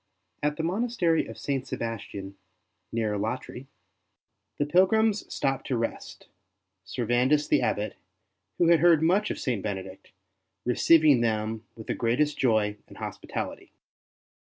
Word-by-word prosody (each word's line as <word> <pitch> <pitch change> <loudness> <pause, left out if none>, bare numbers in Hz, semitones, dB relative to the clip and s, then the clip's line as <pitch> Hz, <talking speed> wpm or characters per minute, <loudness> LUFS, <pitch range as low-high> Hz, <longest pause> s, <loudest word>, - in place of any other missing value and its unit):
At 150 0 0
the 160 - -2
monastery 180 -3 +1
of - - -9
St. 135 -2 -2
Sebastian, 100 -5 -5 0.6
near 110 -2 -1
Alatri, 120 +5 -4 0.9
the 145 - +1
pilgrims 200 +6 +3
stopped 135 -1 -1
to 130 - 0
rest, 115 - -5 0.6
Servandus 125 +5 +1
the - - +3
Abbot, 105 +1 -1 0.6
who 170 - +4
had 170 -1 +6
heard 165 -1 +5
much 190 +6 +3
of - - -3
St. 120 -7 -2
Bene 100 -2 -3
dict, 95 0 -13 0.6
receiving 145 +2 +5
them 110 -1 -1
with 110 - -10
the - - -1
greatest 145 +6 0
joy 110 -5 +2
and - - -14
hospitaUty. - - -6
130 Hz, 130 wpm, -27 LUFS, 110-160 Hz, 0.9 s, had